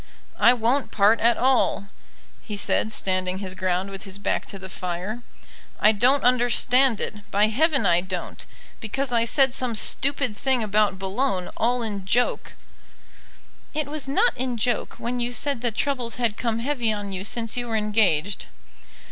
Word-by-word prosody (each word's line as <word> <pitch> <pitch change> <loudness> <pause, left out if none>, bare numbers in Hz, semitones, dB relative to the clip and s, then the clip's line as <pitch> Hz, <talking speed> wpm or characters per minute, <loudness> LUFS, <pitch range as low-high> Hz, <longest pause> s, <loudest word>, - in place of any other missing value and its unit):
"I 240 - +6
won't 245 +4 0
part 210 +2 +3
at 235 +1 +3
all," 245 -6 +1 0.5
he 210 -2 -7
said, 215 +2 0
standing 185 -2 0
his 190 -1 -6
ground 185 +1 -2
with 195 - -7
his 195 -2 -6
back 200 - -2
to 195 - -7
the 190 0 -8
fire. 185 +5 -5 0.6
"I 215 - +6
don't 250 +6 +3
understand 250 0 +3
it, 210 0 -5
by 210 +1 +3
heaven 275 +1 +2
I 175 -1 +4
don't. 185 -1 -6 0.4
Because 255 +4 -3
I 230 -1 +2
said 265 +2 +3
some 250 -3 -1
stupid 270 +1 +1
thing 260 +1 0
about 210 -2 +1
Boulogne, 195 0 -2
all 245 +1 0
in 205 -3 -3
joke 240 +6 -1 0.6
" - - -29
"It 305 - -1
was 290 -1 -5
not 405 - +2
in 250 -1 -3
joke 240 +1 -1
when 245 +1 -4
you 240 0 -1
said 245 +1 0
that 235 -3 -1
troubles 250 -3 -1
had 235 -4 0
come 230 -1 -2
heavy 240 -2 -1
on 205 -2 -4
you 190 0 -4
since 225 +2 -2
you 245 -1 -2
were 225 -1 -1
engaged." 205 -4 0
225 Hz, 175 wpm, -24 LUFS, 200-250 Hz, 0.6 s, I